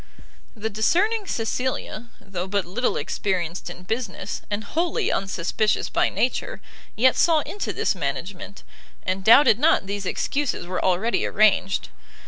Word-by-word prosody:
The 220 0 -4
discerning 390 - +1
Cecilia, 235 -1 -3
though 190 -2 -5
but 200 0 -1
little 230 +8 -1
experienced 180 -3 -2
in 175 +1 -10
business, 210 -1 -4
and 210 +1 -2
wholly 330 +11 -1
unsuspicious 195 +3 0
by - - +2
nature, 250 - -1 0.4
yet 255 +3 +4
saw 325 -3 +4
into 405 +7 -4
this 440 - 0
management, 175 +5 -5 0.4
and 190 +1 -2
doubted 230 +1 +7
not 305 -7 +3
these 200 -1 -4
excuses 285 -3 -1
were 180 +1 -3
already 190 +6 +1
arranged. 205 -2 +2
205 Hz, 130 wpm, -24 LUFS, 185-255 Hz, 0.4 s, doubted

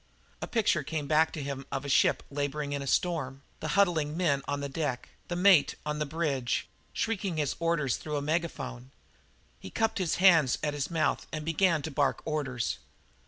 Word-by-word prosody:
A - - -3
picture 215 -9 +2
came 150 0 -3
back 155 +2 +3
to 150 - -4
him 140 -1 -5
of 135 +1 -3
a - - -4
ship 135 - +3
labouring 145 +1 -2
in 140 - -2
a 140 - -5
storm; 140 -5 0 0.2
the - - -4
huddling 165 -6 +2
men 150 -6 +2
on 145 0 -1
the 140 - -3
deck; 140 -3 -3 0.2
the 175 - -3
mate 180 -4 +5
on 150 0 -2
the 150 - -1
bridge, 140 -5 -1 0.2
shrieking 200 -6 -2
his 150 -3 0
orders 165 -6 +1
through 150 -1 -4
a - - -1
megaphone. 145 - -3 0.7
He 95 - -9
cupped 225 - 0
his 175 -4 0
hands 165 -8 +5
at 150 -1 0
his 145 -2 -2
mouth 165 -2 0
and 155 -1 -4
began 165 -1 +2
to 160 - -4
bark 140 0 0
orders. 135 - -2
150 Hz, 190 wpm, -29 LUFS, 140-170 Hz, 0.7 s, mate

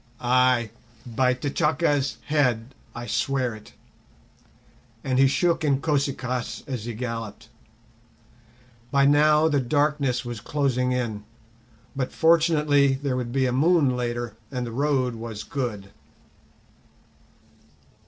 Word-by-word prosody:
Ay, 125 -2 +2 0.3
by 125 +2 +1
T'Chaka's 145 +1 0
head 125 -5 0 0.2
I 120 0 -6
swear 130 -2 -1
it!" 110 -1 -13 1.3
and 130 -2 0
he 135 - +6
shook 170 +4 +1
Inkosi 140 -1 +1
kaas 125 -1 -4
as 125 -5 -5
he 120 -2 -5
galloped. 115 -3 -6 1.4
By 140 +2 +3
now 150 +2 +4
the 145 -3 +2
darkness 140 -1 0
was 120 -3 -6
closing 130 -4 0
in, 115 -5 -2 0.7
but 130 -2 -2
fortunately 150 -4 +3
there 135 -1 -2
would 125 -2 -3
be 135 +1 +1
a 125 - 0
moon 145 -1 +3
later, 120 -2 -3
and 125 -3 -3
the 115 - -6
road 130 -1 0
was 115 -2 -7
good. 110 -8 -4
130 Hz, 115 wpm, -24 LUFS, 120-145 Hz, 1.4 s, he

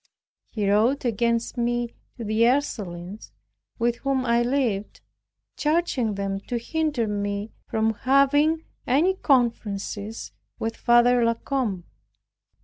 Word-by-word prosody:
He 210 -3 -2
wrote 225 +7 +2
against 235 +1 0
me 240 0 -1 0.2
to 235 - -6
the 215 +1 0
Ursulines 205 -8 -3 0.5
with 235 0 +1
whom 270 -1 -1
I 235 0 +3
lived, 240 -5 -1 0.6
charging 295 -9 0
them 195 0 -2
to 245 - -1
hinder 295 0 -1
me 205 +1 -3 0.2
from 220 0 +1
having 285 +6 +3 0.2
any 310 +9 +3
conferences 225 - -1 0.3
with 225 0 -3
Father 240 0 +4
La 230 0 +2
Combe. 230 -8 -2
235 Hz, 115 wpm, -25 LUFS, 210-265 Hz, 0.6 s, Father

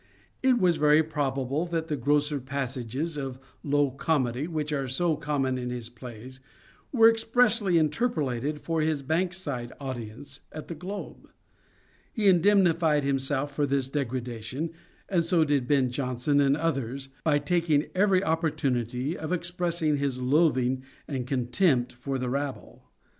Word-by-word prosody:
It 260 -1 +4
is 175 -3 +4
very 150 +1 +5
probable 145 0 -1
that 165 -1 -2
the 150 - -1
grosser 145 +2 +2
passages 135 +3 -3
of 135 -3 -4 0.2
low 145 -1 +2
comedy 135 -1 0
which 155 -3 -2
are 135 -2 -1
so 160 +6 +1
common 140 -4 -1
in 125 0 -3
his 120 -1 -4
plays 125 +1 -10 0.5
were 225 -4 +7
expressly 225 -4 +3
interpolated 150 - 0
for 165 +1 -1
his 155 -2 0
Bankside 160 -6 -2
audience 130 0 -6
at 155 - -8
The - - -3
Globe. 185 +6 -7 0.8
He 215 -3 0
indemnified 175 -5 +4
himself 140 +1 -1
for 145 0 0
this 135 -1 0
degradation, 130 +1 -3 0.4
and 175 -3 +2
so 165 -1 +3
did 140 -4 +1
Ben 135 -3 +2
Jonson 130 +2 0
and 140 +1 +3
others, 135 -4 -2
by 150 -2 +3
taking 155 0 +1
every 190 0 +3
opportunity 135 - 0
of 160 -2 -5
expressing 170 -3 0
his 140 -2 -1
loathing 130 -2 +2 0.3
and 130 -4 -3
contempt 125 +1 +1
for 135 +2 -4
the 125 -1 -3
rabble. 140 +1 -5
145 Hz, 140 wpm, -27 LUFS, 130-165 Hz, 0.8 s, were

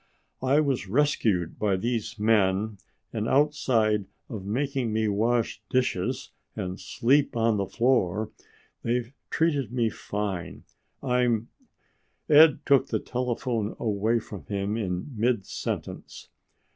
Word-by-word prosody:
"I 135 +3 +3
was 135 -9 -1
rescued 110 - +1
by 100 -3 +2
these 115 +2 -2
men 105 -1 +2 0.3
and 110 0 -1
outside 120 -8 +2 0.2
of 110 -7 -6
making 130 +1 -1
me 110 0 +1
wash 110 +1 0
dishes 130 +1 0 0.2
and 95 -3 -4
sleep 135 +1 +1
on 115 -1 +2
the 100 -1 -1
floor, 110 -3 +1 0.5
they've 120 +1 -1 0.2
treated 145 -8 +1
me 120 -3 +1
fine. 100 -5 -4 0.4
I'm 125 -3 +1 0.4
" - - -44
Ed 150 0 +7
took 140 -2 +4
the - - 0
telephone 120 -3 -2
away 110 +1 +1
from 105 -4 -7
him 100 +1 -2
in 95 +3 -3
mid 115 -2 +1
sentence. - - -5
115 Hz, 120 wpm, -27 LUFS, 105-125 Hz, 0.5 s, Ed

